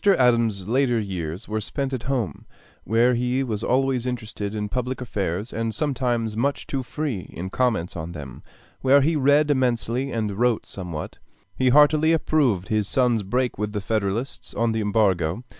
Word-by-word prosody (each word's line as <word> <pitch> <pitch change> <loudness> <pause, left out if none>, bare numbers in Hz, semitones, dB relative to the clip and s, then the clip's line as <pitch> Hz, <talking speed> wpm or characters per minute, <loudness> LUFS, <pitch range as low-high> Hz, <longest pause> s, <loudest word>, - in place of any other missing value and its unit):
Adams's 115 -6 +2
later 120 0 +2
years 90 -3 -4
were 110 0 -2
spent 135 +5 -3
at 130 - -2
home, 115 - -2 0.4
where 120 +3 +3
he 125 +2 0
was 110 -4 -3
always 130 -1 +1
interested 110 -4 -4
in 105 -1 -2
public 125 +3 -3
affairs 100 -3 -3
and 115 -1 -2
sometimes 120 -5 -1
much 140 +5 -1
too 135 - -2
free 130 - -4
in 95 +3 -5
comments 115 -9 0
on 85 0 -5
them; 70 -6 -8 0.4
where 135 +2 +5
he 160 +4 +2
read 145 +1 +4
immensely 130 0 0
and 105 -3 -2
wrote 120 -2 +2
somewhat. 85 -5 -6 0.4
He 130 -1 +2
heartily 150 +3 +5
approved 135 - +1
his 110 -2 +1
son's 120 -3 +2
break 125 +4 -1
with 105 0 -2
the 105 - -1
Federalists 110 +4 -2
on 115 0 +1
the 110 0 -1
Embargo. 100 -2 +1
115 Hz, 165 wpm, -24 LUFS, 105-130 Hz, 0.4 s, where